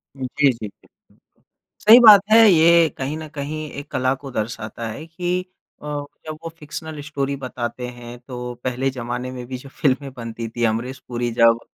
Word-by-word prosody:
जी, 130 -2 -4 0.2
जी, 115 -3 -7
जी। 100 - -19 1.0
सही 230 +3 +11
बात 210 -4 +10
है, 225 - +8
ये 170 -1 +6
कहीं 135 +3 -3
न 160 0 -7
कहीं 155 +1 -5
एक 145 - -11
कला 130 0 +1
को 135 - -7
दर्शाता 110 0 -4
है 140 +9 -7
कि 180 +2 -2 0.4
अ, - - -8 0.4
जब 155 -1 -6
वो 165 - -4
फ़िक्शनल 155 0 -7
स्टोरी 140 -2 -2
बताते 125 -2 -5
हैं, 120 0 -10
तो 125 -1 -7
पहले 130 +1 -1
ज़माने 125 0 -4
में 125 -1 -7
भी 130 0 -5
जो 135 +2 -12
फ़िल्में 135 0 0
बनती 115 -1 -5
थी, 120 +1 -4
अमरीश 120 +4 -2
पुरी 120 -1 -2
जब 115 0 +6
130 Hz, 180 wpm, -21 LUFS, 120-155 Hz, 1.0 s, सही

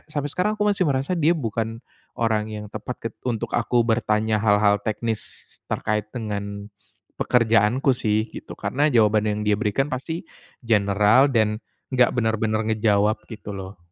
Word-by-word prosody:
sampai 145 -2 -3
sekarang 210 +6 0
aku 210 - 0
masih 195 -5 +1
merasa 135 +4 0
dia 170 0 +2
bukan 115 -3 -3 0.4
orang 110 -2 0
yang 105 -1 -6
tepat 110 +4 -5
ket - - -29
untuk 115 -3 -3
aku 120 0 +2
bertanya 110 -2 +1
hal-hal 105 -1 +3
teknis 110 +1 -2 0.5
terkait 105 0 -1
dengan 100 -3 -5 0.5
pekerjaanku 115 +3 +3
sih 110 -3 0
gitu, - - -9
karena 145 +3 0
jawaban 110 -4 +3
yang 105 0 -1
dia 105 - +2
berikan 120 +5 0
pasti 160 +7 -4 0.4
general 105 +4 +4
dan 110 -4 +1 0.3
nggak 125 -1 +5
benar-benar 110 -1 0
ngejawab 105 0 +2
gitu 110 -2 -8
loh. 95 0 -8
110 Hz, 145 wpm, -23 LUFS, 105-125 Hz, 0.5 s, nggak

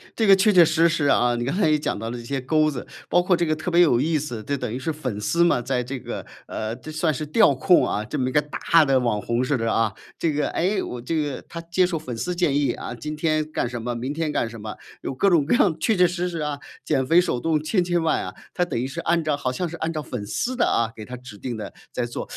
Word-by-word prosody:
这 225 - +1
个 195 -2 +8
确 205 +3 +4
确 180 -4 +7
实 165 +2 +3
实 155 -3 0
啊。 120 -3 +3
你 120 0 -2
刚 140 +7 -1
才 175 -6 +3
也 150 - +4
讲 150 - -2
到 115 +2 -4
了 120 - -5
这 120 - -8
些 135 +2 -3
钩 155 +3 +2
子， 130 - -6 0.2
包 175 - +3
括 180 -1 +2
这 170 - +1
个 155 0 +1
特 160 +3 -4
别 175 0 +5
有 125 -8 +4
意 155 +2 +1
思， 125 -7 -5
这 140 +4 -2
等 125 -4 -4
于 125 - -4
是 160 +5 -2
粉 125 -9 -4
丝 170 +11 +2
嘛， 170 -8 +3
在 125 0 -1
这 130 +1 -5
个， - - -6 0.2
呃， 110 +1 -4
这 155 +4 -9
算 155 0 0
是 150 - -4
调 210 -1 +5
控 175 +7 +4
啊， 105 - -1
这 125 +7 -5
么 130 - 0
一 130 - -1
个 150 - +3
大 155 +2 +3
的 135 -2 +3
网 115 -4 0
红 120 +2 0
似 145 +2 +1
的 115 -2 0
啊。 115 -3 +1 0.2
这 160 -3 0
个， 150 - 0
哎， 190 +3 0
我 125 - -5
这 125 +7 -3
个 145 -4 -1
他 170 - -7
接 170 +2 +1
受 170 -3 -2
粉 125 -6 -6
丝 180 +8 -2
建 155 -6 +2
议， 140 -4 +2
啊， 120 - -6
今 150 +5 -5
天 155 0 0
干 120 - -1
什 120 -1 -5
么、 120 +2 -3
明 125 +4 -3
天 155 0 -2
干 115 - -1
什 115 -1 -10
么， 105 0 -6 0.3
有 - - -4
各 195 +10 +2
种 160 -6 +3
各 - - +1
样 170 -6 +3
确 220 +6 +2
确 180 -1 +5
实 180 +1 -2
实 170 -2 -4
啊， 150 -2 -3 0.2
减 130 -1 +1
肥 170 +5 +5
手 125 -8 -1
动 155 +1 0
千 180 +3 +1
千 175 -1 0
万 160 - +1
啊， - - -7 0.2
他 180 - +2
等 115 - -3
于 130 - -1
是 155 +5 -6
按 170 0 +1
照 150 -2 0
好 130 - -2
像 170 +6 -3
是 170 - -7
按 165 +1 -2
照 155 - -3
粉 125 -6 -6
丝 255 - -2
的 240 - +2
啊， 115 -1 +1
给 110 - -8
他 125 - -7
指 120 -4 -12
定 120 +2 -5
的， 105 -2 -6 0.2
在 120 - -2
做。 120 - -6
150 Hz, 320 characters per minute, -23 LUFS, 125-170 Hz, 0.3 s, 个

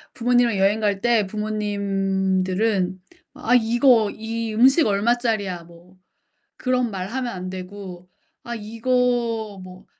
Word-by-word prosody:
부모님이랑 245 -3 +2
여행 200 +3 +3
갈 205 -2 +1
때 235 -3 +3
부모님들은 195 -2 -1 0.3
"아 245 - +1
이거 235 -2 +4
이 225 0 -4
음식 265 +8 +5
얼마짜리야?" 210 -4 0
뭐 175 +2 -18 0.6
그런 250 -2 0
말하면 235 +7 -3
안 185 0 -6
되고 185 -1 -9 0.4
아 235 - -5
이거 230 -2 -1
뭐 185 +2 -13
215 Hz, 230 characters per minute, -22 LUFS, 190-235 Hz, 0.6 s, 음식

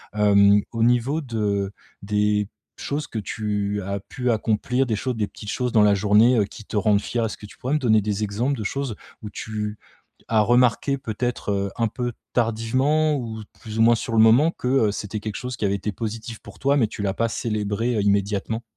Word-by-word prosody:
heu, 100 -1 +5
au 115 -1 -3
niveau 125 +5 +2
de 105 -6 -1 0.3
des 105 0 +1 0.3
choses 145 +1 -3
que 110 - -4
tu 105 0 -2
as 100 +1 -3
pu 125 +4 -2
accomplir, 115 +4 0
des 110 -3 -1
choses 125 +3 -2
des 105 -2 0
petites 105 - -10
choses 125 0 -1
dans 110 - +5
la 105 -1 +5
journée, 105 +5 +4
heu, 105 - +3
qui 110 +2 -11
te 105 - -4
rendent 105 -1 +3
fière. 115 +1 -1
Est-ce 110 - -4
que 105 - -11
tu - - -16
pourrais 130 +4 -2
me 150 - +2
donner 110 -5 +3
des 105 +1 -2
exemples 120 +7 -1
de 110 - -4
choses 135 +1 -3 0.3
où 105 - -5
tu 105 -1 -4 0.5
as 110 -2 +4
remarqué, 125 +4 +3
peut-être, 120 -3 -3
heu, 100 -1 -1
un 115 -1 +2
peu 120 +1 -3 0.2
tardivement, 130 +7 +1
ou 115 -4 -5 0.2
plus 110 -1 -6
ou - - +5
moins 115 +1 +6
sur 115 +1 -4
le 110 - +3
moment, 120 +9 +6
que, 125 - -6
heu, 125 -6 +3
c'était 105 +1 -4
quelque 105 -1 -5
chose 125 -1 -5
qui 105 - -1
avait 100 - +1
été 100 +2 -3
positif 115 +1 -5
pour - - -14
toi, 140 +1 +2
mais 115 -5 +3
tu 105 - -7
l'as 95 -1 0
pas 115 0 0
célébré, 110 +1 -1
heu, 105 - +1
immédiatement? 100 +3 0
110 Hz, 215 wpm, -23 LUFS, 105-120 Hz, 0.5 s, moins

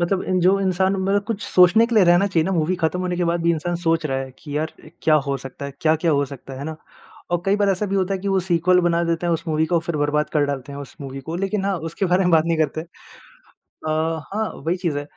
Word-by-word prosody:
मतलब 185 +2 0
इं 185 -1 +2
जो 185 +3 +4
इंसान 190 0 +1
मतलब 195 +1 0
कुछ 220 -2 -3
सोचने 185 +6 +5
के 235 - -3
लिए 210 -4 +6
रहना 175 +3 +5
चाहिए 170 -5 +1
ना 190 - -1
मूवी 170 +1 +1
खत्म 175 +1 -1
होने 180 -1 -2
के 175 - 0
बाद 170 0 0
भी 170 - +3
इंसान 175 +2 -2
सोच 165 -1 +1
रहा 135 -2 -1
है 135 0 -5
कि 145 -2 -6
यार 155 +2 -2 0.3
क्या 155 - +4
हो 140 0 0
सकता 135 +1 -9
है? 140 - -7
क्या-क्या 160 +1 +2
हो 145 -1 +2
सकता 135 -1 -10
है? 130 - -7
है 140 - -6
ना, 160 +1 -5 0.5
और 175 -1 0
कई 195 +1 +3
बार 205 -1 +2
ऐसा 195 +2 0
भी 195 - -1
होता 190 0 0
है 190 - -4
कि 200 - -3
वो 195 -1 +2
सीक्वल 180 0 +3
बना 170 -1 +1
देते 170 +1 -1
हैं, 170 - +2
उस 165 0 -2
मूवी 155 0 +1
को 175 - -1
और 170 - +3
फिर 170 -2 -3
बर्बाद 150 +1 0
कर 150 -2 +3
डालते 140 0 -4
हैं 140 - -7
उस 140 -2 -9
मूवी 135 -1 -6
को 170 - -2
लेकिन 195 +1 -1
हाँ 195 -1 0
उसके 180 +4 -1
बारे 180 +1 +2
में 180 - +2
बात 160 -2 +4
नहीं 165 -1 +1
करते 155 0 0
अ, 170 +2 -15 1.3
हाँ 220 +1 -1 0.2
वही 170 +2 +1
चीज़ 170 -5 -2
है 145 - -3
170 Hz, 285 wpm, -22 LUFS, 155-190 Hz, 1.3 s, लिए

